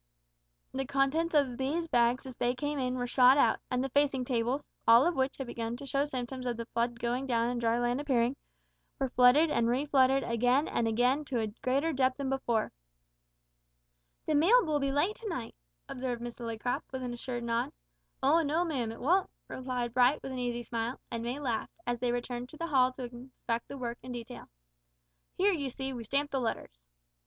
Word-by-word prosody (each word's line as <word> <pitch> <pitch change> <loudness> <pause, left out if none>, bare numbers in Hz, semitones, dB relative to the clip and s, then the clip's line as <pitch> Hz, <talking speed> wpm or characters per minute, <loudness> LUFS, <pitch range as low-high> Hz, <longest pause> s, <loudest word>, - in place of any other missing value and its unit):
The 270 -1 -2
contents 285 +5 +1
of 270 -4 +2
these 310 +6 -1
bags 240 -2 +2
as 260 -2 -8
they 245 +1 0
came 290 +2 -2
in 255 -1 -1
were 245 -1 -2
shot 255 +2 +6
out, - - +4
and 250 0 0
the 270 - -2
facing 275 -2 +1
tables 245 +3 -1 0.2
all 230 +4 +8
of 345 0 +1
which 265 +1 0
had 270 - -4
begun 235 -1 -4
to 280 - -9
show 275 +1 +1
symptoms 255 -2 -4
of 240 -2 -2
the 230 - -4
flood 235 0 -2
going 245 +3 -1
down 235 -1 +1
and 245 -1 -2
dry 230 0 +2
land 240 +3 0
appearing 255 -3 +1 0.6
were 270 -2 -1
flooded 255 +6 +5
and 230 - +2
reflooded 270 +1 +3
again 245 +5 +2
and 230 - 0
again 245 +6 +2
to 260 -3 -1
a 220 - 0
greater 280 +6 +1
depth 260 -1 +1
than 275 -2 -2
before. 240 -4 0 1.5
"The 310 - 0
mail 370 +12 +5
will 305 -2 +1
be 275 -1 0
late 310 +10 +1
to 450 -3 -6
night," 255 -10 -4 0.3
observed 250 -2 -3
Miss 240 0 -7
Lillycrop, 230 +1 -2
with 260 -1 -4
an 245 -1 -3
assured 240 0 -5
nod. 235 0 -1 0.5
"O 305 +5 +5
no, 320 +3 +1
ma'am, 255 -9 -2
it 225 - -9
won't," 360 +8 +2 0.2
replied 250 -2 -3
Bright, 250 +3 +3
with 270 - -5
an 260 - -4
easy 240 -1 -2
smile, 235 +1 -3
and 230 - -3
May 240 +3 -3
laughed 245 -6 -3
as 240 -1 -1
they 245 0 0
returned 245 0 -4
to 310 - -12
the 335 - -3
hall 260 -5 +3
to 255 - -7
inspect 240 -1 -5
the 280 - -7
work 240 -2 -4
in 250 +1 -7
detail. 240 +1 -8 0.9
"Here, 400 +2 +3
you 285 -6 -2
see, 265 +1 -5
we 240 -2 -6
stamp 280 +6 -1
the 270 - 0
letters." - - -4
255 Hz, 205 wpm, -31 LUFS, 240-275 Hz, 1.5 s, all